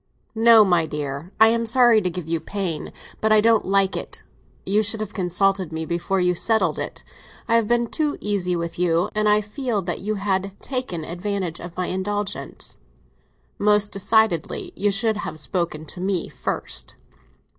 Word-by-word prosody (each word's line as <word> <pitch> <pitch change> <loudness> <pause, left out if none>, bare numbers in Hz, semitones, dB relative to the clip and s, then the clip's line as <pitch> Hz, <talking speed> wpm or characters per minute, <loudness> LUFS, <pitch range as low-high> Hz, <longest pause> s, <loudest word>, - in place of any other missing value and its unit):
"No, 225 -1 +7
my 175 -4 +2
dear. 150 +3 -5
I 220 0 +8
am 230 0 0
sorry 235 -1 +5
to 185 - 0
give 175 -2 -6
you 165 0 0
pain; 180 -4 -4 0.3
but 220 - +1
I 215 - +6
don't 225 0 +3
like 195 0 +2
it. - - -6 0.4
You 205 +3 +2
should 220 +1 -1
have 215 -1 -5
consulted 190 -1 +1
me 160 0 -4
before 175 +3 -1
you 180 0 +2
settled 220 +5 +1
it. - - -6 0.4
I 230 - +3
have 230 -2 +3
been 240 +1 +2
too 300 +5 -1
easy 190 -4 -1
with 170 0 -4
you, 170 -1 +1
and 215 0 +1
I 210 0 +4
feel 230 +2 -3
as 175 - +1
if - - -10
you 215 +2 -2
had 195 -1 -2
taken 250 - -4
advantage 180 -1 -3
of 175 0 -9
my 180 - 0
indulgence. 205 +2 -3 0.8
Most 210 0 +3
decidedly, 210 -2 +1
you 205 - +1
should 215 +2 +1
have 160 - -5
spoken 155 +1 -2
to 175 +4 -8
me 190 -2 -1
first." - - -3
195 Hz, 175 wpm, -23 LUFS, 175-215 Hz, 0.8 s, I